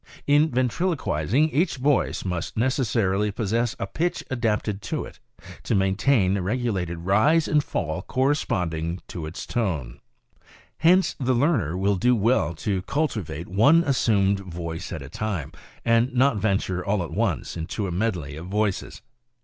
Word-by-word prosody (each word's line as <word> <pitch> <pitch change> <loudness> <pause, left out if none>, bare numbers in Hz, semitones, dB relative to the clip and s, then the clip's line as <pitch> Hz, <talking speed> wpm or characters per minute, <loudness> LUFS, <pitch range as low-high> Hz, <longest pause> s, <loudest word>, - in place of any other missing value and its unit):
In 145 +2 +4
ventriloquizing 130 - 0
each 160 +1 +1
voice 135 -4 +1
must 90 0 -3
necessarily 110 -5 +1
possess 115 +4 -1
a - - -3
pitch 175 +2 -2
adapted 105 -4 -1
to - - -3
it, - - -13 0.4
to - - -1
main 95 -1 +2
tain 100 -5 +3
a 100 - -1
regulated 95 -5 -1
rise 145 - +3
and 150 -1 +2
fall 85 - -3
corresponding 90 - -1
to 80 -3 -5
its 80 - -7
tone. 80 - -2 0.8
Hence 180 +3 +4
the 130 -1 +1
learner 120 - +1
will 100 +1 +1
do 125 +6 +3
well 110 -5 +1
to 95 +3 -2
cultivate 105 - -2
one 145 - +5
assumed 100 -8 +2
voice 85 -3 -6
at 80 -4 -5
a - - -9
time, 95 -6 -3 0.3
and 115 +2 +3
not 130 -1 +3
venture 95 -3 0
all 100 -2 0
at 85 - -7
once - - -1
into 85 +5 -3
a 95 - -3
medley 85 -7 -2
of 85 +3 -8
voices. 105 0 -2
105 Hz, 150 wpm, -24 LUFS, 90-130 Hz, 0.8 s, one